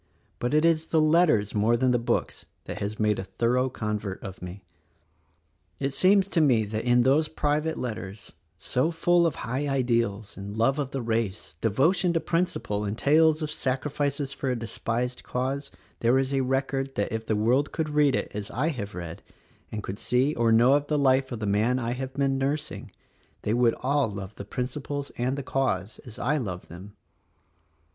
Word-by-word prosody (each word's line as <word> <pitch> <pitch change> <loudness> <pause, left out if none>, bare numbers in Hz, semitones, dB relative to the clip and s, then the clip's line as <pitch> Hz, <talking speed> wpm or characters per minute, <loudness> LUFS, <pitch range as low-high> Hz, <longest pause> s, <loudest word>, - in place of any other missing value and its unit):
But 125 +5 0
it 155 +2 +4
is 160 -1 +2
the 160 - +2
letters 155 - +3
more 110 +3 +3
than 130 +1 +2
the 120 - +2
books 115 - -2 0.2
that - - -6
has 100 +1 -4
made 105 -1 +2
a - - -3
thorough 125 +6 0
convert 105 -4 -3
of 95 -2 -8
me. 90 +2 -8 1.2
It 135 0 -1
seems 195 +4 +4
to 170 - +2
me 120 -7 +4
that 110 +2 -4
in 120 0 +4
those 145 +5 +3
private 150 +1 -1
letters, 105 -4 -6 0.2
so 125 - 0
full 170 +1 +3
of 160 - -2
high 130 +5 -2
ideals, 115 -6 0
love 110 +8 0
of 140 -3 -1
the 135 -2 -4
race, 110 -7 -2
devotion 165 - +2
to 165 - +2
principle, 165 - -1
and 105 +1 -3
tales 155 +3 +4
of 150 - -3
sacrifices 140 0 -1
for 135 - -3
a 125 - +1
despised 115 +2 -3
cause 135 +3 -2 0.3
there 120 +3 +3
is 135 +1 0
a 135 - +2
record 135 +1 -1
that 100 - -1
if 110 0 -4
the 110 - +1
world 120 +7 +2
could 160 -2 -2
read 150 -3 +3
it - - -2
as 105 0 -5
I 145 +7 0
have 105 - -5
read, 85 -2 -6 0.5
and 105 -1 -4
could 100 +3 -5
see 130 +4 +2
or 115 -3 +2
know 120 +4 +6
of 145 0 +2
the 150 - +1
life 130 -1 +3
of 120 - -3
the 110 - -3
man 105 +5 +2
I 120 -2 -2
have 130 +1 -5
been 135 -1 +1
nursing, 145 +3 -2 0.5
they 105 - 0
would 120 -1 +3
all 140 -1 +2
love 100 0 -7
the 100 - -8
principles 140 +5 -4
and 130 +3 -1
the 140 - -4
cause 110 -7 -1
as 115 -3 -10
I 150 +5 +1
love 95 -9 -5
them. 95 +5 -11
125 Hz, 190 wpm, -27 LUFS, 110-145 Hz, 1.2 s, know